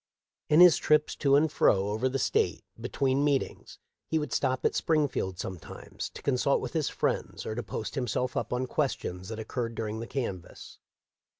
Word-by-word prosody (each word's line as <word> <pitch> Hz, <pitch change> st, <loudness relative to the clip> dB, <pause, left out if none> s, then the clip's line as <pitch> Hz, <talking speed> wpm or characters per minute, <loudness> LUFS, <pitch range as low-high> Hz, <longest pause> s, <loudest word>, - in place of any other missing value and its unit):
In 155 Hz, +3 st, +6 dB
his 180 Hz, -2 st, +9 dB
trips 150 Hz, 0 st, +2 dB
to 140 Hz, -2 st, +3 dB
and 150 Hz, +1 st, +3 dB
fro 100 Hz, -7 st, +3 dB
over 110 Hz, +5 st, 0 dB
the 135 Hz, -, -1 dB
State, -, -, 0 dB, 0.2 s
between 135 Hz, +1 st, 0 dB
meetings, 145 Hz, -2 st, -1 dB, 0.3 s
he 160 Hz, -, 0 dB
would 150 Hz, -1 st, -3 dB
stop 130 Hz, -2 st, 0 dB
at -, -, +3 dB
Springfield 145 Hz, -, 0 dB
sometimes, 90 Hz, -2 st, -7 dB
to -, -, -9 dB
consult 140 Hz, +1 st, +2 dB
with -, -, -6 dB
his 160 Hz, -3 st, 0 dB
friends -, -, -2 dB
or -, -, -3 dB
to 120 Hz, -, -3 dB
post 110 Hz, -, -5 dB
himself 125 Hz, -1 st, -2 dB
up -, -, -2 dB
on 125 Hz, +1 st, 0 dB
questions 100 Hz, -10 st, -2 dB
that 110 Hz, -, -5 dB
occurred 115 Hz, +1 st, -4 dB
during 110 Hz, -1 st, -3 dB
the 115 Hz, -, -6 dB
canvass. 105 Hz, -11 st, -6 dB
130 Hz, 180 wpm, -29 LUFS, 110-145 Hz, 0.3 s, his